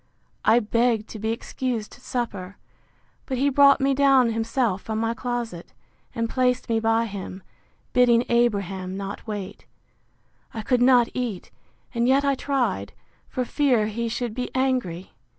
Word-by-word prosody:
I 225 Hz, +2 st, +5 dB
begged 230 Hz, 0 st, +1 dB
to 220 Hz, -, -8 dB
be 220 Hz, +2 st, -1 dB
excused 230 Hz, -1 st, -4 dB
supper; 205 Hz, -7 st, -5 dB, 0.7 s
but 260 Hz, -, -2 dB
he 280 Hz, +3 st, +2 dB
brought 280 Hz, +1 st, +6 dB
me 275 Hz, 0 st, +2 dB
down 270 Hz, -3 st, +4 dB
himself 225 Hz, -3 st, 0 dB
from 220 Hz, -1 st, -4 dB
my 225 Hz, +1 st, 0 dB
closet, 235 Hz, -7 st, -5 dB, 0.4 s
and 230 Hz, 0 st, 0 dB
placed 250 Hz, +1 st, 0 dB
me 225 Hz, -1 st, +2 dB
by 225 Hz, +1 st, +2 dB
him, 195 Hz, -3 st, -7 dB, 0.5 s
bidding 245 Hz, -1 st, +4 dB
Abraham 200 Hz, -6 st, 0 dB
not 200 Hz, +3 st, -6 dB
wait. 205 Hz, -2 st, -6 dB, 0.9 s
I 220 Hz, -, -4 dB
could 250 Hz, +2 st, +1 dB
not 245 Hz, -2 st, +5 dB
eat, 240 Hz, -7 st, -4 dB, 0.4 s
and 235 Hz, 0 st, +1 dB
yet 275 Hz, +2 st, +3 dB
I 280 Hz, -, +3 dB
tried, 245 Hz, -, -1 dB, 0.4 s
for 255 Hz, -, -2 dB
fear 250 Hz, -5 st, +2 dB
he 230 Hz, +2 st, -3 dB
should 235 Hz, -1 st, -3 dB
be 250 Hz, +2 st, -3 dB
angry. 250 Hz, -10 st, -1 dB
235 Hz, 150 wpm, -24 LUFS, 215-255 Hz, 0.9 s, brought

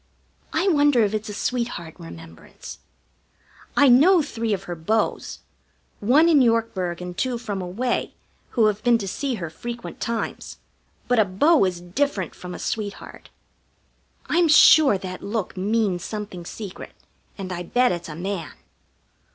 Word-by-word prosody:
I 335 Hz, +5 st, 0 dB
wonder 290 Hz, -, +4 dB
if 205 Hz, 0 st, 0 dB
it's 215 Hz, 0 st, -3 dB
a -, -, -5 dB
sweetheart 235 Hz, -10 st, -3 dB
remembrance? 165 Hz, -1 st, -11 dB, 1.0 s
I 285 Hz, -, +6 dB
know 310 Hz, +8 st, +6 dB
three 230 Hz, -5 st, -3 dB
of 195 Hz, -2 st, -1 dB
her 180 Hz, -, -5 dB
beaux; 175 Hz, +7 st, 0 dB, 0.8 s
one 275 Hz, +10 st, +4 dB
in 310 Hz, -5 st, +5 dB
Yorkburg 220 Hz, -7 st, 0 dB
and 180 Hz, 0 st, -7 dB
two 250 Hz, +4 st, -1 dB
from 205 Hz, -5 st, -4 dB
away, 205 Hz, +8 st, -2 dB, 0.4 s
who 225 Hz, -, +5 dB
have 210 Hz, 0 st, 0 dB
been 240 Hz, -1 st, +4 dB
to 200 Hz, -3 st, -5 dB
see 265 Hz, +6 st, -2 dB
her 170 Hz, -6 st, -6 dB
frequent 235 Hz, +7 st, -7 dB
times; 230 Hz, -1 st, -4 dB, 0.5 s
but 245 Hz, -1 st, +2 dB
a 215 Hz, -, +5 dB
beau 310 Hz, -7 st, +5 dB
is 180 Hz, -2 st, -3 dB
different 190 Hz, -, -2 dB
from 180 Hz, 0 st, -8 dB
a -, -, -6 dB
sweetheart. 205 Hz, -2 st, -6 dB, 1.0 s
I'm 345 Hz, 0 st, +2 dB
sure 300 Hz, -5 st, +7 dB
that 185 Hz, -1 st, -7 dB
look 210 Hz, -1 st, -3 dB
means 200 Hz, -1 st, 0 dB
something 205 Hz, -5 st, -6 dB
secret, 200 Hz, 0 st, -8 dB, 0.4 s
and 190 Hz, -2 st, -6 dB
I 175 Hz, -, -4 dB
bet 245 Hz, +8 st, +2 dB
it's 175 Hz, -2 st, -4 dB
a 150 Hz, -, -7 dB
man. 175 Hz, -3 st, -4 dB
215 Hz, 150 wpm, -23 LUFS, 185-245 Hz, 1.0 s, sure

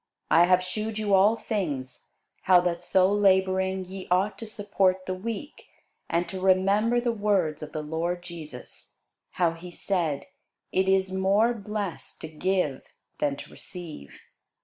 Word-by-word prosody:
I 170 Hz, +2 st, +7 dB
have 180 Hz, 0 st, +4 dB
shewed 215 Hz, +4 st, -3 dB
you 210 Hz, -2 st, 0 dB
all 200 Hz, +4 st, +6 dB
things, 150 Hz, -, -4 dB, 0.3 s
how 180 Hz, -1 st, +6 dB
that 175 Hz, -1 st, -1 dB
so 185 Hz, +2 st, +3 dB
labouring 190 Hz, -1 st, +2 dB
ye 190 Hz, +1 st, -8 dB
ought 185 Hz, +4 st, +2 dB
to 225 Hz, -, -6 dB
support 200 Hz, -4 st, 0 dB
the 185 Hz, -, -2 dB
weak, 230 Hz, +9 st, -6 dB, 0.4 s
and 170 Hz, +1 st, 0 dB
to 185 Hz, +2 st, -6 dB
remember 195 Hz, +5 st, +3 dB
the 240 Hz, 0 st, 0 dB
words 200 Hz, -8 st, 0 dB
of 155 Hz, 0 st, -7 dB
the 155 Hz, -, -4 dB
Lord 170 Hz, +3 st, -2 dB
Jesus, 160 Hz, -7 st, -10 dB, 0.4 s
how 175 Hz, -2 st, +2 dB
he 165 Hz, +2 st, -10 dB
said, 170 Hz, -5 st, -1 dB, 0.5 s
It 190 Hz, +1 st, +2 dB
is 190 Hz, 0 st, +2 dB
more 195 Hz, +5 st, +3 dB
blessed 210 Hz, -4 st, -5 dB
to -, -, -5 dB
give 160 Hz, -3 st, -1 dB, 0.4 s
than 145 Hz, -1 st, +1 dB
to -, -, -11 dB
receive. 165 Hz, -, -9 dB
185 Hz, 150 wpm, -27 LUFS, 170-200 Hz, 0.5 s, I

